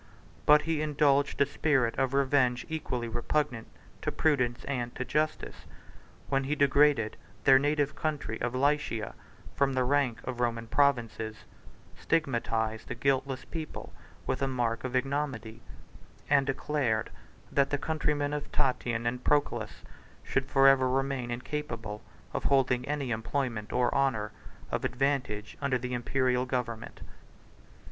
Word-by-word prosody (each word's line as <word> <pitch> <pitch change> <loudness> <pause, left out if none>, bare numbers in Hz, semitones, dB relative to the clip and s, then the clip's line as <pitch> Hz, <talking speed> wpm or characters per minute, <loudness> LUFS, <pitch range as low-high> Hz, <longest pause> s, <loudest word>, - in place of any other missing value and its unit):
But 150 0 +7
he 165 -2 0
indulged 145 -2 +2
a - - +7
spirit 140 -4 +1
of 135 0 +1
revenge 130 -3 +2
equally 135 -7 -3
repugnant 120 +1 -1 0.3
to - - -1
prudence 125 -6 +1
and 120 -4 -3
to 130 - -3
justice, 155 +3 -2 0.6
when 135 -1 +1
he 145 +2 0
degraded 140 -5 +3 0.3
their 130 +2 +7
native 145 0 +1
country 150 -8 -3
of 120 +1 -1
Lycia 140 -5 0 0.4
from 140 -1 +2
the 130 -1 +2
rank 130 -3 +1
of 120 - -5
Roman 115 -1 0
provinces; 115 -4 0 0.5
stigmatized 115 -7 -1
a - - -3
guiltless 135 +1 0
people 160 -3 -7 0.3
with - - -1
a 135 - +2
mark 120 -3 -1
of 130 0 -3
ignominy; 130 -4 -2 0.7
and 140 -1 +3
declared, 135 -5 0 0.4
that 140 -1 +3
the 145 - 0
countrymen 145 -1 -1
of 150 -1 -4
Tatian 120 -3 0
and 125 +1 -2
Proculus 145 -1 0 0.4
should 135 0 -1
forever 135 -2 +5
remain 135 -1 -1
incapable 120 -4 -4 0.3
of - - -3
holding 130 -2 +2
any 145 -4 -2
employment 115 -1 -2
of 125 0 +2
honor 115 -6 +1 0.4
or - - 0
advantage 125 -6 -1
under 140 -2 +1
the 125 +1 -5
Imperial 125 +1 +1
government. 125 -3 -4
135 Hz, 135 wpm, -29 LUFS, 120-145 Hz, 0.7 s, But